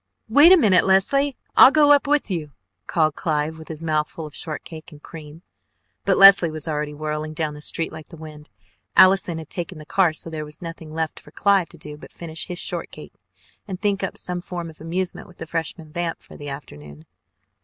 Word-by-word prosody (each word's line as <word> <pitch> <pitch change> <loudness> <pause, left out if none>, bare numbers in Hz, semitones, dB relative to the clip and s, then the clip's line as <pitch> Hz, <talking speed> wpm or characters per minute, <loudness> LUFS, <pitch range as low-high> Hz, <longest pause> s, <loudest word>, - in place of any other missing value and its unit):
"Wait 290 +9 +7
a 375 - +9
minute, 205 - +4
Leslie, 270 +9 +2 0.2
I'll - - +9
go 295 0 +4
up 290 0 +4
with 290 -7 +1
you," 155 -5 -4 0.3
called 155 -2 +1
Clive 155 0 -2
with 160 - -12
his 160 0 -8
mouth 155 -2 0
full 160 - -8
of 150 - -11
shortcake 160 0 -6
and 150 -1 -15
cream, 160 +1 -11 0.6
but - - +2
Leslie 195 -3 +8
was 155 0 -7
already 150 -1 -3
whirling 155 +1 -4
down 155 -1 -2
the 150 - -11
street 165 +2 -1
like 160 -1 -10
the 165 - -12
wind. 155 -1 -12 0.5
Allison 185 -3 +5
had 160 -2 -9
taken 175 -1 -5
the 155 - -11
car, 185 0 +2
so 160 +1 -6
there 155 -1 -4
was 150 0 -7
nothing 165 -2 -9
left 160 0 -3
for - - -17
Clive 195 -4 +2
to - - -15
do 150 0 -9
but - - -14
finish 165 -1 -7
his 180 -2 -6
shortcake - - -6 0.5
and 185 -3 -6
think 200 -1 0
up 190 - -4
some 180 0 -4
form 175 -2 -6
of 155 - -20
amusement 175 +3 -4
with 180 - -18
the - - -7
Freshman 165 -1 -5
vamp 170 -1 -3
for - - -15
the 145 0 -8
afternoon. 75 - -10
165 Hz, 210 wpm, -22 LUFS, 155-185 Hz, 0.6 s, a